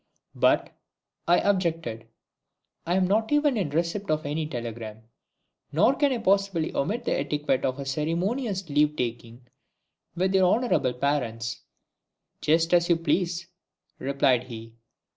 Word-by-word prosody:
"But," - - +2 0.5
I 175 +1 +5
objected, 165 - -1 0.8
"I 175 - +1
am 190 -1 +3
not 220 +5 +1
even 295 -2 +3
in 195 -9 -1
receipt 170 +6 -2
of 155 0 0
any 150 +2 -2
telegram. 115 -4 -6 0.7
Nor 170 - +4
can 285 0 +2
I 255 - 0
possibly 195 -6 +1
omit 225 - -1
the - - 0
etiquette 145 -3 -1
of 130 0 0
a 140 - -5
ceremonious 180 - -1
leave 150 0 +2
taking 120 0 -5 0.7
with 185 +2 0
your 185 -1 +4
honourable 230 - +1
parents." 120 -4 -2 0.8
"Just 165 +2 +2
as 175 0 +4
you 170 - +5
please," 175 +1 0 0.5
replied 135 -2 +2
he. 115 -2 -9
160 Hz, 135 wpm, -26 LUFS, 130-190 Hz, 0.8 s, I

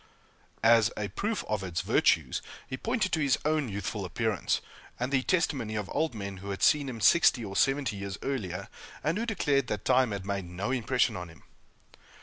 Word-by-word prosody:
As 115 -1 +6
a 105 -1 -2
proof 210 - -2
of 105 -2 -1
its 85 -3 -2
virtues, 90 - +2 0.3
he 130 - -4
pointed 225 - -1
to 160 - +1
his 140 -4 +3
own 155 -4 +1
youthful 100 +1 -3
appearance, 105 +3 0 0.4
and 125 +2 -2
the 135 -2 +3
testimony 130 - 0
of 105 -2 -3
old 160 -6 0
men 100 -2 -5
who 100 +2 -8
had 100 - -3
seen 145 -2 +4
him 120 -3 -6
sixty 125 -2 +5
or 100 -1 -7
seventy 135 -4 +1
years 100 0 -5
earlier, 100 -8 -3 0.4
and 165 +7 0
who 230 - -2
declared 145 -11 +1
that 105 -1 -3
time 130 -1 +4
had 100 -2 -4
made 100 -2 -2
no 95 +7 -3
impression 125 0 +1
on 90 -2 -6
him. 80 - -17
115 Hz, 190 wpm, -29 LUFS, 100-140 Hz, 0.4 s, As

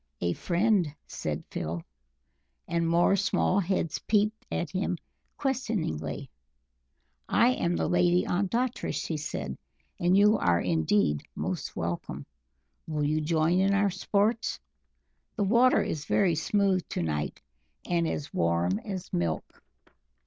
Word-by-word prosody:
"A 85 0 0
friend!" 180 - +1
said - - -4
Phil. 80 +1 -3 0.8
And 170 -1 0
more 170 +3 +4
small 200 -1 +2
heads 185 -4 -1
peeped 215 0 0
at 170 - -2
him 185 -1 -1 0.4
questioningly. 215 - -2 1.0
"I 235 - +5
am 175 -9 0
the - - 0
Lady 175 0 +3
Ondatra," 230 +7 -1
she 160 - -2
cried, 65 - -4 0.4
"and 175 +2 +3
you 210 +2 +5
are 85 0 +3
indeed 80 -2 +1
most - - -3
welcome. 85 +1 -4 0.6
Will 150 -2 -1
you 155 +2 +1
join 160 +3 +2
in 195 +1 +3
our 200 0 +3
sports? 210 +5 0 0.8
The 210 - 0
water 235 +6 +4
is 150 -2 -3
very 190 -4 +3
smooth 190 +4 +2
to - - -2
night, 75 -2 -2 0.5
and 170 -2 +1
as 145 -2 -4
warm 85 +3 +1
as 190 - -6
milk." 85 -2 -2
175 Hz, 125 wpm, -28 LUFS, -, 1.0 s, I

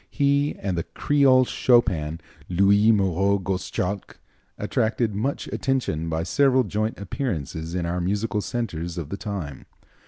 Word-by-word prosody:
He 140 0 +1
and 95 -2 -2
the 85 - -1
"Creole 135 +1 +3
Chopin," 90 -13 +2 0.3
Louis 100 +4 +4
Moreau 100 -1 +2
Gottschalk, 95 +1 -3 0.4
attracted 110 0 0
much 115 +8 -2
attention 120 - -1
by 80 0 -1
several 130 +9 +3
joint 110 +1 -2
appearances 85 - -4
in 90 -2 -1
our 90 +1 -2
musical 105 +3 -1
centres 90 -8 -4
of 80 -4 -5
the 100 - -4
time. 95 -11 -6
100 Hz, 130 wpm, -24 LUFS, 85-120 Hz, 0.4 s, Louis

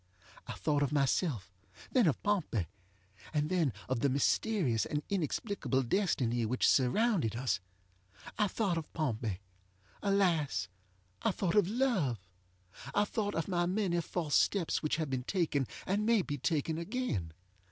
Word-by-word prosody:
I - - -4
thought 145 -2 0
of 140 - +1
myself, 135 - 0 0.4
then 245 -8 +4
of 150 - 0
Pompey, 180 - 0 0.7
and 150 +2 +1
then 170 -7 +2 0.2
of 130 -2 0
the 140 - +2
mysterious 140 - +1
and 150 0 -2
inexplicable 185 - -1
destiny 120 - +1
which 125 +3 +2
surrounded 145 - +3
us. 125 -2 0 0.8
I 210 - +2
thought 190 -4 0
of 155 - -10
Pompey! 115 - -2 0.6
ŌĆöalas, 170 - +1 0.5
I - - +2
thought 180 -4 -1
of 205 -4 +5
love! 205 - +1 0.8
I 205 - +4
thought 205 -1 -2
of 165 - -1
my 175 -2 +1
many 180 -2 +1
false 160 -2 -3
steps 190 -5 +2
which 155 - 0
have 155 -3 -2
been 130 -1 0
taken, 145 -3 0 0.2
and 200 +3 0
may 225 -3 +3
be 145 -3 -4
taken 160 +2 0
again. 170 - -2
160 Hz, 145 wpm, -32 LUFS, 130-200 Hz, 0.8 s, of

